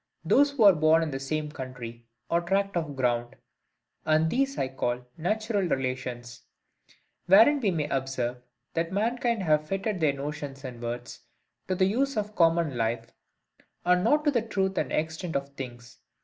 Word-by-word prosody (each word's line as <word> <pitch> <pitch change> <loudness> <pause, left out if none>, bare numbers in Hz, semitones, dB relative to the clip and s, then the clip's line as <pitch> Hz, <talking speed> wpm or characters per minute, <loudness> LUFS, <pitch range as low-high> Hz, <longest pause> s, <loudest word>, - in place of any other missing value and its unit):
those 275 - +5
who 280 -5 +1
were 200 -2 +9
born 160 +1 +4
in 155 - -3
the 135 - -3
same 150 +2 -3
country 125 -4 -8 0.2
or 170 0 +1
tract 195 +3 0
of 160 -4 -2
ground; 120 -2 0 0.7
and 155 +1 +2
these 275 +2 0
I 130 - 0
call 125 -2 -3
NATURAL 215 +3 -1
RELATIONS: 125 -3 -3 0.9
wherein 225 +10 +7
we 220 -6 +1
may 155 -5 -1
observe, 130 -3 -2 0.3
that 165 +1 -1
mankind 230 +1 0
have 155 -2 +2
fitted 195 +1 -2
their 155 -4 +3
notions 140 -1 -6
and 125 -3 -7
words 120 +1 -5 0.5
to 185 - 0
the 185 - +3
use 260 +6 0
of 210 0 -2
common 165 -4 +3
life, 115 0 -2 0.7
and 180 0 +4
not 295 +7 +3
to 295 - +4
the 240 -4 +1
truth 195 -3 -1
and - - -2
extent 160 +1 -2
of 140 0 -1
things. 125 -3 -9
155 Hz, 165 wpm, -27 LUFS, 130-195 Hz, 0.9 s, were